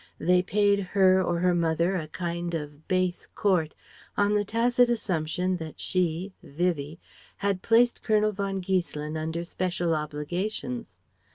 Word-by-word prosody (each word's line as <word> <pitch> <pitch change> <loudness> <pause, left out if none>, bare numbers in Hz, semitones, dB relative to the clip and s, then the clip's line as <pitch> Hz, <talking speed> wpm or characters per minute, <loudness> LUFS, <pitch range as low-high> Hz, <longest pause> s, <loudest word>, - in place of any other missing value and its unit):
They 180 +1 +3
paid 200 +2 +2
her 190 -1 +4
or 175 -1 0
her 180 +1 +2
mother 170 +2 +1
a 160 -4 -3
kind 170 +1 -3
of 150 -1 -7
base 185 -2 0
court, 180 -7 +1 0.4
on 205 0 +3
the 210 0 +2
tacit 240 +3 +2
assumption 180 -4 -1
that 160 -2 -8
she 180 +1 -1
Vivie 155 0 -2 0.4
had 200 -2 -1
placed 240 +1 +3
Colonel 215 -1 +2
von 195 -1 -3
Giesselin 170 -5 -2
under 160 +2 -3
special 175 -1 -1
obligations. 175 +11 -3
180 Hz, 135 wpm, -27 LUFS, 165-200 Hz, 0.4 s, her